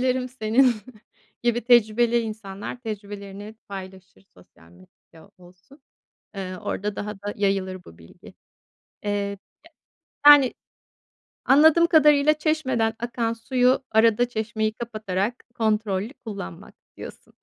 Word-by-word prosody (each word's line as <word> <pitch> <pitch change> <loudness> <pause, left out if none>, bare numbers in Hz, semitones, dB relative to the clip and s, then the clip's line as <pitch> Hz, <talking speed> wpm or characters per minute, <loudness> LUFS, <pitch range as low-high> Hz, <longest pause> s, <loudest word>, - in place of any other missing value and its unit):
dilerim 255 0 0
senin 250 +1 +2 0.7
gibi 240 0 +1
tecrübeli 235 0 +4
insanlar 215 0 -7
tecrübelerini 205 -2 -8
paylaşır, 190 -1 -10
sosyal 85 -2 -21
medyada 95 - -20
olsun. 180 - -19 0.6
Eee, 185 -1 -5
orada 205 +3 -4
daha 210 0 -5
da 205 0 -7
yayılır 195 -2 -1
bu 80 - -15
bilgi. 85 0 -16 0.7
Eee, 200 -1 -2 0.9
yani, 290 -3 +8 0.9
anladığım 315 +4 +6
kadarıyla 300 -2 +5
çeşmeden 280 -8 0
akan 235 -1 -2
suyu, 250 +3 +1
arada 225 +2 +3
çeşmeyi 220 -1 -2
kapatarak 215 -1 -4
kontrollü 215 0 -1
kullanmak 145 - -8 0.2
diyorsun - - -11
220 Hz, 105 wpm, -24 LUFS, 195-245 Hz, 0.9 s, yani